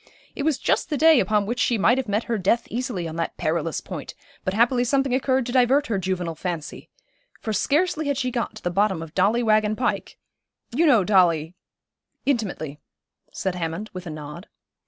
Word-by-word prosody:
It - - -4
was 300 -1 +1
just - - 0
the 295 - -1
day 320 -1 +6
upon 210 -3 +1
which 235 +4 -3
she 235 - +2
might 235 +5 +3
have 260 - -3
met 210 +3 0
her 230 -2 -2
death 200 +5 +1
easily 230 -8 -3
on 160 0 -6
that 165 - -3
perilous 160 0 -1
point, - - -7 0.3
but 185 - -2
happily 245 +2 +3
something 270 +1 +1
occurred 260 -1 +1
to 245 - -4
divert 260 +3 +3
her 215 -7 -1
juvenile 180 -2 -2
fancy, 165 -1 -5 0.5
for 220 - -3
scarcely 310 - +1
had 285 -2 0
she 255 -2 -1
got 235 -2 -3
to 215 - -11
the 175 - -1
bottom 190 -2 +1
of 160 -1 -11
Dolly 210 +6 +2
Waggon 215 -1 +3
Pike 250 - -2 0.5
you 315 +8 +2
know 235 -9 +5
Dolly 175 -5 +3 0.4
' - - -54
'Intimately,' 190 - -2 0.5
said 190 - -2
Hammond, 175 +4 -4
with 185 -1 -7
a - - -4
nod. 155 +4 -8
215 Hz, 200 wpm, -24 LUFS, 175-255 Hz, 0.5 s, day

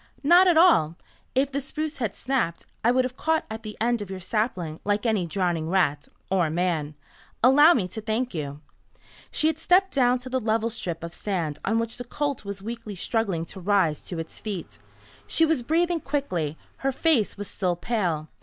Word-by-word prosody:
"Not 350 +6 +7
at 345 -3 +5
all. 245 - +5 0.4
If 270 +1 +2
the 280 +1 -1
spruce 305 +2 -4
had 225 -6 -2
snapped, 240 -11 -1 0.2
I 230 - +4
would 255 +1 +3
have 255 0 -5
caught 320 +3 0
at 220 +1 -5
the 215 -1 -8
end 235 0 +1
of 205 - -6
your 190 -1 -5
sapling 185 -5 -2
like 205 +2 0
any 210 -6 +1
drowning 170 -2 -1
rat 150 -6 +1 0.2
or 180 -4 +2
man. 160 -3 -1 0.5
Allow 290 +7 +7
me 190 -7 0
to 220 - -6
thank 225 +3 -1
you." 145 -3 -5 0.7
She - - 0
had 315 0 +2
stepped 370 +3 +3
down 250 -2 +3
to 250 +1 -9
the 260 0 0
level 225 0 0
strip 170 -7 -4
of 170 0 -6
sand 175 -7 -3
on 225 +3 +1
which 230 0 -2
the 245 - -5
colt 280 +1 -3
was 200 -1 -7
weakly 230 -2 -6
struggling 190 -4 -1
to 190 - -8
rise 185 -5 +2
to 175 - -5
its 165 0 -6
feet. 175 - -6 0.5
She 325 - +4
was 320 -5 +1
breathing 335 +6 +1
quickly. 185 - -2 0.2
Her 270 - 0
face 270 -7 +1
was 205 0 -5
still 180 -3 -1
pale. 175 -6 -1
220 Hz, 195 wpm, -25 LUFS, 175-260 Hz, 0.7 s, Not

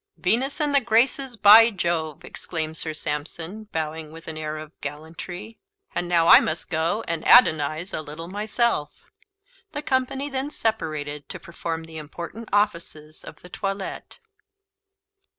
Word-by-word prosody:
"Venus 245 +9 +1
and 295 -2 +1
the 280 - +5
Graces, 240 +2 +1
by 220 +3 +9
Jove!" 170 -7 -2
exclaimed 160 -2 -3
Sir 160 - -1
Sampson, 160 +7 -4
bowing 160 -4 -4
with 165 +1 -12
an 160 - -5
air 155 0 -4
of 155 0 -9
gallantry; 165 +8 -7 0.3
"and 175 - -2
now 170 -2 +3
I - - +10
must 160 +4 -3
go 170 +7 0
and 165 -1 -2
adonise 160 - +5
a - - -2
little 155 +2 -8
myself." 210 -3 -1 0.6
The 295 - -4
company 265 +1 0
then 270 0 -3
separated 155 - -3
to - - -7
perform 165 -1 -5
the 160 -1 -9
important 170 +9 -8
offices 170 -6 -1
of - - -12
the 180 - -12
toilet. 195 - -5
170 Hz, 145 wpm, -24 LUFS, 155-220 Hz, 0.6 s, I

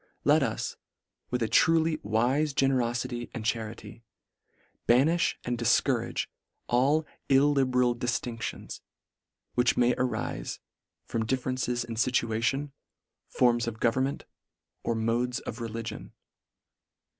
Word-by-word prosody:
Let - - +5
us, - - -2 0.5
with 125 -1 0
a - - +1
truly 160 +3 +3
wife 130 +8 +1
generoiity 120 -2 0
and 115 -3 -5
charity, 115 0 -4 0.8
banirti 155 +8 +4
and 120 -1 -2
dil 120 - 0 0.2
courage 120 -4 -1 0.4
all 140 +6 +2 0.2
illiberal 135 -3 +3
diftinctions, 120 -1 -4 0.7
which 125 0 +2
may 125 0 +4
arife 125 - -2 0.5
from 115 -1 -2
differences 130 -1 -1
in 120 -1 -6
iituation, 125 +4 0 0.6
forms 120 -1 +2
of 110 -1 -4
government, 130 +4 0 0.6
or 115 - -1
modes 120 +2 0
of 115 +2 -7
religion. 115 0 -6
125 Hz, 105 wpm, -28 LUFS, 115-135 Hz, 0.8 s, Let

